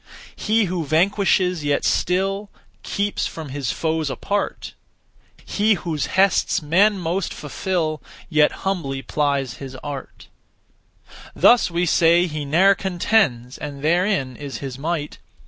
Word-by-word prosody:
He 220 +1 +1
who 180 -3 -2
vanquishes 180 +1 +2
yet 145 -1 0
still 195 +3 0 0.3
Keeps 205 0 -2
from 160 -3 -8
his 135 -3 -2
foes 160 -2 -1
apart; 200 +9 -3 0.7
He 210 +1 +2
whose 160 -6 -3
hests 195 0 +3
men 190 +7 +3
most 180 +2 -2
fulfil 155 +1 -2 0.3
Yet 150 -3 +3
humbly 140 -9 -2
plies 140 -4 -1
his 135 -1 -8
art. 145 -2 -8 1.1
Thus 240 -5 +5
we 175 +1 0
say, 170 +1 +4
'He 150 -4 -4
ne'er 180 +8 +5
contends, 175 - 0
And 145 -1 -7
therein 170 -5 +1
is 140 0 -7
his 135 -2 -7
might.' 155 0 -3
165 Hz, 125 wpm, -22 LUFS, 145-190 Hz, 1.1 s, Thus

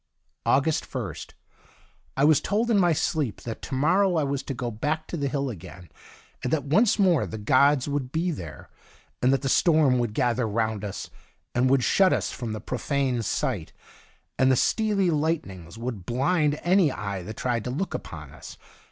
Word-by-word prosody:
August 145 +3 +2
1st. - - -6 0.4
— - - -34
I 135 - +2
was 150 0 +5
told 225 +4 0
in 210 - +4
my 175 -2 +4
sleep 155 -6 -1
that 115 -2 -6
to - - -5
morrow 180 +7 +3
I 160 - +2
was 140 -1 -1
to 135 - -5
go 120 0 -3
back 150 +8 -2
to - - -6
the 140 -4 -1
hill 140 -1 -2
again, 90 -3 -11 0.5
and 125 - -2
that 155 -4 +1
once 195 - +3
more 185 -7 +3
the 110 - -6
gods 130 +6 +3
would 140 -3 -2
be 170 +3 0
there, 80 - -8 0.5
and 125 - +4
that 135 +1 +1
the - - 0
storm 150 -3 +4
would 115 -3 -2
gather 125 -2 +1
round 110 -1 -1
us, 100 -2 -6 0.4
and 125 +2 +2
would 135 -1 +3
shut 190 +7 +4
us - - -1
from 110 -4 -5
profane 130 +1 -1
sight, 110 - -2 0.7
and 130 0 +5
the - - +4
steely 200 - +1
light 160 +1 +1
nings 90 0 -11
would 115 -5 -5
blind 145 +4 +1
any 175 -4 +4
eye 100 -3 -4
that 105 +5 -8
tried 120 -3 -1
to - - -2
look 165 +10 -3
upon - - -7
us. - - -11
135 Hz, 190 wpm, -26 LUFS, 120-160 Hz, 0.7 s, was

